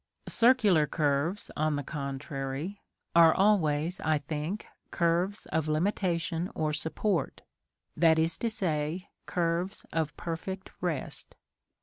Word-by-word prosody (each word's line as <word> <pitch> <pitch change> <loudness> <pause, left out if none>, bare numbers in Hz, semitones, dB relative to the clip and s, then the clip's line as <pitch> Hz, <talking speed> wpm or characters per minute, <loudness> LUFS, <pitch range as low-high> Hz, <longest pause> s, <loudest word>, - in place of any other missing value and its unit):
Circular 220 -10 +4
curves, 150 +7 0
on 155 0 +1
the 145 - -2
contrary, 140 +5 -4 0.3
are 165 -1 +7
always, 175 -4 +2
I 155 -1 +2
think, 150 +7 -4 0.2
curves 175 +4 0
of 155 0 0
limitation 170 +1 0
or 155 -1 0
support; 160 +2 -1 0.5
that 165 -1 +5
is 160 +1 +1
to 235 - 0
say, 170 -3 -2 0.2
curves 175 +2 -1
of 160 -2 -1
perfect 185 +3 -5
rest. 170 -6 -4
165 Hz, 110 wpm, -29 LUFS, 150-185 Hz, 0.5 s, are